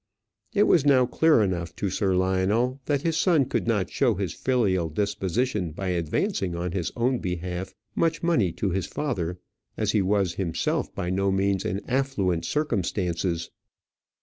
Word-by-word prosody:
It 205 - +5
was 170 -8 +4
now 135 -3 +5
clear 150 -1 +4
enough 85 -3 -2
to 100 - -2
Sir 95 0 +1
Lionel 95 +8 +1
that 145 -1 0
his 165 -1 +1
son 160 -5 +3
could - - -2
not 105 -6 0
show 125 -6 +2
his 95 -4 -3
filial 100 -10 +1
disposition 100 - -1
by 95 +3 -3
advancing 90 - -1
on 85 +1 -3
his 90 -3 -2
own 125 +1 +1
behalf 90 +1 -4 0.2
much 165 -1 0
money 120 - +2
to 100 - -1
his 95 -1 -1
father, 90 - -2 0.4
as 105 -2 +1
he 105 - +2
was 95 -2 +1
himself 85 -4 -1
by 90 - -2
no 95 +1 +1
means 95 0 +1
in 95 +2 -3
affluent 115 -11 0
circumstances. 90 - -1
100 Hz, 160 wpm, -26 LUFS, 90-125 Hz, 0.4 s, It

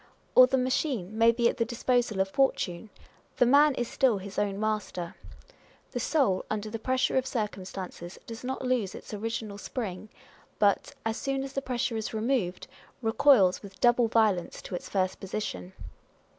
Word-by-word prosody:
Or 255 0 +9
the 265 - +1
machine 255 - -1
may 230 +1 +5
be 235 0 +2
at - - -1
the 235 - +2
disposal 235 -3 0
of 190 - +1
fortune: 215 -6 0 0.5
the 245 - +5
man 285 +3 +5
is 240 -2 -2
still 250 -5 +2
his 195 +1 -5
own 200 -1 -1
master. 210 -5 -2 0.8
The 245 - -3
soul, 240 - +1
under 215 0 -3
the 225 - -4
pressure 260 +3 +1
of 260 - -4
circumstances, 190 -6 -5
does 230 +1 -8
not 260 +1 -3
lose 245 -7 0
its - - -10
original 215 -1 -4
spring, 215 -2 -5 0.5
but, 205 -1 +2
as 225 0 -1
soon 270 0 -2
as 270 0 -7
the 275 - -1
pressure 245 -3 -2
is 220 0 -4
removed, 220 -6 -1 0.4
recoils 225 -5 +4
with 195 -2 -12
double 240 -1 +4
violence 215 -6 +1
to - - -8
its 175 - -5
first 185 -1 0
position. 185 - -5
225 Hz, 170 wpm, -28 LUFS, 195-250 Hz, 0.8 s, Or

